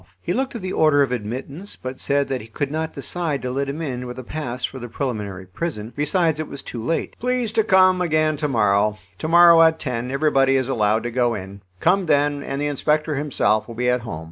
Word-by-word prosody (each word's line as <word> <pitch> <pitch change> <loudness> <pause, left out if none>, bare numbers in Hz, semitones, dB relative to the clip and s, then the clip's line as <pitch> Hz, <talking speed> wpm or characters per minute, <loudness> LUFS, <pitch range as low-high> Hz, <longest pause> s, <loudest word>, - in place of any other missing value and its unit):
He - - -2
looked 265 -1 -2
at 225 - -6
the 185 - -3
order 150 -2 +4
of 135 - -2
admittance, 130 - -5
but 130 0 -7
said 140 0 +1
that 130 -2 -2
he 110 - -11
could 140 +5 -3
not 160 +1 -2
decide 165 -5 -3
to 125 - -2
let 140 +2 -2
him 155 +4 -4
in 125 -4 -4
with 125 +1 -7
a 130 - -6
pass 125 -3 -4
for 130 - -7
the 120 -1 -7
preliminary 105 -7 -4
prison. 110 - -5
Besides, 155 +1 +1
it 155 - -3
was 140 - -8
too 115 -2 -6
late. 165 +7 -2
"Please 250 -2 -1
to 220 0 +2
come 185 -2 +4
again 155 -2 +2
to 150 - -1
morrow. 105 -4 +2 0.2
To - - -3
morrow, 170 0 +7
at 160 0 +5
10, 125 -3 -3
everybody 135 -1 +2
is 130 -2 +1
allowed 110 -4 +1
to 120 - -3
go 120 -1 +1
in. 100 0 -8 0.2
Come 185 +1 +2
then, 145 -1 +2
and 135 0 -4
the 145 - -1
inspector 150 +2 0
himself 130 -7 +1
will 115 - -8
be 125 +1 +1
at 125 0 0
home. 110 -9 -6
140 Hz, 235 wpm, -22 LUFS, 120-160 Hz, 0.2 s, morrow